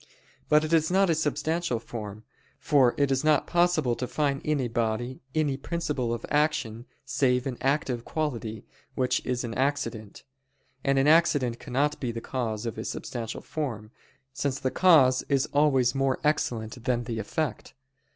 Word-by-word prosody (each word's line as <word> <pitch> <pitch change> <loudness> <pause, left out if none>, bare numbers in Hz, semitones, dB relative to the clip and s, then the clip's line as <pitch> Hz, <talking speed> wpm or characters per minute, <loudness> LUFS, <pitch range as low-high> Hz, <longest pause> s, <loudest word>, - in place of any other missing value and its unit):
But 150 0 +5
it 155 +1 -2
is 160 -1 +3
not 190 0 +3
a - - +4
substantial 155 -1 -1
form; 110 -2 -7 0.3
for 130 -5 +3
it 140 -1 +2
is 135 +1 +1
not 155 -1 +3
possible 170 -8 +2
to 125 - -3
find 140 -1 -1
in 150 -1 0
a 130 - 0
body 120 +2 -2
any 150 -4 +1
principle 145 -6 -2
of 120 -1 -3
action, 140 -6 0 0.2
save 125 -1 +1
an 135 -3 -3
active 135 -3 0
quality, 115 -9 -3 0.3
which 130 -1 0
is 125 0 -1
an 115 -2 -4
accident; 130 -6 -2 0.6
and 135 0 +2
an 135 - +3
accident 145 -7 +3
cannot 145 +3 -1
be 125 -3 -2
the 115 - -5
cause 115 -3 -3
of 115 - -4
a - - -3
substantial 115 -2 -5
form, 115 -9 -5 0.4
since 140 -1 -2
the 130 -2 -1
cause 150 -8 +5
is 135 -1 +2
always 135 -4 +3
more 135 -1 0
excellent 120 -6 -1
than 120 -2 +1
the 115 -2 -4
effect. 145 +7 -3
130 Hz, 165 wpm, -27 LUFS, 120-150 Hz, 0.6 s, But